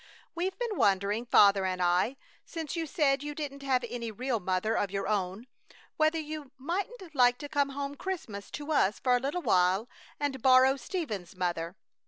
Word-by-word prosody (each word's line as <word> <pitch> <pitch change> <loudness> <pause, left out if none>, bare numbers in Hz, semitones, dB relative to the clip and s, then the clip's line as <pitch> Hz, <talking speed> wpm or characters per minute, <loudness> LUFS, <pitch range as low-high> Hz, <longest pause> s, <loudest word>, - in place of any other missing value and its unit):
We've 370 +3 -2
been 470 -4 -3
wondering, 200 +4 +2
Father 200 -4 +6
and 185 -1 -1
I, 180 +9 +2 0.3
since 325 -1 -5
you 330 -1 -2
said 285 -5 +2
you 295 0 -5
didn't 280 -2 -5
have 260 -3 +1
any 235 0 -4
real 240 +2 -2
mother 185 +4 0
of 205 - 0
your 195 0 -3
own, 200 +1 -1 0.5
whether 310 +1 +2
you 305 -2 -5
mightn't 360 - -4
like 245 -3 +4
to 290 - -7
come 285 -2 +1
home 280 +1 -4
Christmas 285 - -5
to 295 +1 -6
us 215 -9 +3
for 250 -1 +2
a - - +2
little 285 +7 -2
while 185 +5 +3 0.3
and 280 -3 -2
borrow 260 +1 +6
Stephen's 220 - -5
mother. 175 -1 -2
260 Hz, 180 wpm, -30 LUFS, 200-300 Hz, 0.5 s, Father